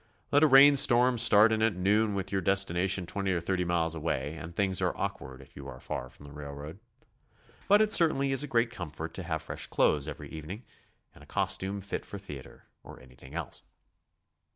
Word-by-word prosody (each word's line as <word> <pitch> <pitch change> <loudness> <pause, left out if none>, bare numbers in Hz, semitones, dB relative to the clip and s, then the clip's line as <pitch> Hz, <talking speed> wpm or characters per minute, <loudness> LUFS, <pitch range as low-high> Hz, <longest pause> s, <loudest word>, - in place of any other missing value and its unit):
Let 145 - +4
a 155 - +6
rain 140 +1 +7
storm 125 -2 +4
start 110 -1 +5
in 110 0 0
at 110 -3 +1
noon 105 +3 +1
with 95 0 -4
your 95 -1 -1
des 95 - +2
tination 95 -1 0
20 95 +2 -2
or 85 - -1
30 90 +1 -2
miles 85 -1 0
away 80 -2 -3
and 80 +1 -9
things 95 -2 -1
are - - -1
awkward 65 0 -6
if - - -22
you - - -10
are - - -10
far 65 - -6
from 70 - -17
the 70 - -12
railroad. 75 +3 -9 0.9
But 205 +2 +5
it 215 0 +2
certainly 140 -5 +4
is 135 - +1
a 150 - -3
great 120 -2 0
comfort 80 -5 -7
to - - -6
have 80 -3 -4
fresh - - -6
clothes 75 -1 +1
every 75 -1 -8
evening, 85 +9 -8 0.5
and - - -17
a - - -18
costume 100 +1 -2
fit 100 - -5
for 100 - -9
theatre 75 -9 -11 0.2
or - - -13
anything 65 +3 -15
else. 85 -2 -6
95 Hz, 205 wpm, -29 LUFS, 80-110 Hz, 0.9 s, rain